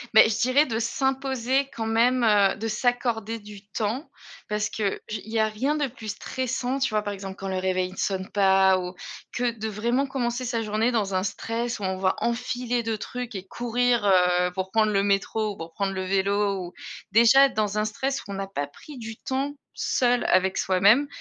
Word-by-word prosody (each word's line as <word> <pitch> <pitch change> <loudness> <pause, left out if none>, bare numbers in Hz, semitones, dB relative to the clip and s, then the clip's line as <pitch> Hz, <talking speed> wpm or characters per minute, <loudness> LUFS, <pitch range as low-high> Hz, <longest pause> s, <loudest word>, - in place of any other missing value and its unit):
Beh, 220 - +9
je 220 - -1
dirais 255 +5 +4
de 225 -4 -2
s'imposer 265 +2 0
quand 225 - -3
même, 235 +3 +3
heu 205 -3 +4
de 225 +1 -4
s'accorder 230 -1 0
du 205 -1 -12
temps. 220 - -3 0.4
Parce 210 0 -1
que 205 -3 -1
je 215 - -4
il 220 - -11
y 225 - -1
a 220 - +3
rien 255 +8 -1
de 295 -1 +1
plus 230 -3 -11
stressant, 255 +4 -2
tu 265 - +1
vois 215 -1 0
par 205 -1 -3
exemple 195 -1 -7
quand 195 - -6
le 190 - -2
réveil 185 0 0
ne - - -12
sonne 190 -1 -1
pas 190 -1 +4
ou 180 0 -6 0.4
que 245 0 0
de 220 -1 -5
vraiment 235 +6 0
commencer 255 -1 -2
sa 235 -2 -1
journée 215 +3 +1
dans 210 -5 0
un 185 - +2
stress 230 +4 -3
où - - -7
on 190 0 -1
va 185 0 +2
enfiler 245 0 -1
2 225 -1 -2
trucs 245 +2 -6
et 190 -1 -5
courir, 240 +1 0
heu, 180 -2 +4
pour 190 0 -4
prendre 215 0 +3
le 195 -1 +2
métro 205 +2 0
ou 200 - -9
pour 165 0 -8
prendre 195 +1 -1
le 190 0 -3
vélo. 200 +1 +1
Ou 175 - -10 0.4
déjà 235 +6 +7
dans 210 -3 -1
un 210 - +1
stress 265 +5 -2
où 200 - -10
on - - -4
n'a 195 0 -4
pas 145 -7 -3
pris 275 - -13
du 225 -1 -7
temps 270 +2 -2 0.2
seul 245 -1 +1
avec 185 +1 +2
soi-même, 200 +9 +4
220 Hz, 210 wpm, -25 LUFS, 195-245 Hz, 0.4 s, Beh